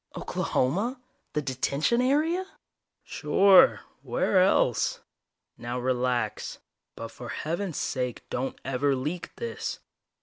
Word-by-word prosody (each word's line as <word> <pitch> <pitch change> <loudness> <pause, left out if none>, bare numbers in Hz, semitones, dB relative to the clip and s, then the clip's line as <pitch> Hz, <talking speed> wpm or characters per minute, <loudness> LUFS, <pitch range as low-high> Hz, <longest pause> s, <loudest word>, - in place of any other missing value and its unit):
"Oklahoma? 205 - -1 0.3
The 150 - -1
Detention 140 - 0
area?" 310 +8 +2 0.6
"Sure. 195 -1 +5 0.2
Where 345 - +2
else? 180 - +2 0.6
Now 120 +1 -4
relax. 125 -3 -1 0.4
But - - -6
for - - -9
heaven's 170 +2 -3
sake, 125 -2 -3
don't 130 +2 -3
ever 135 +1 +1
leak 150 +7 -4
this. 470 0 -4
150 Hz, 100 wpm, -27 LUFS, 130-205 Hz, 0.6 s, Sure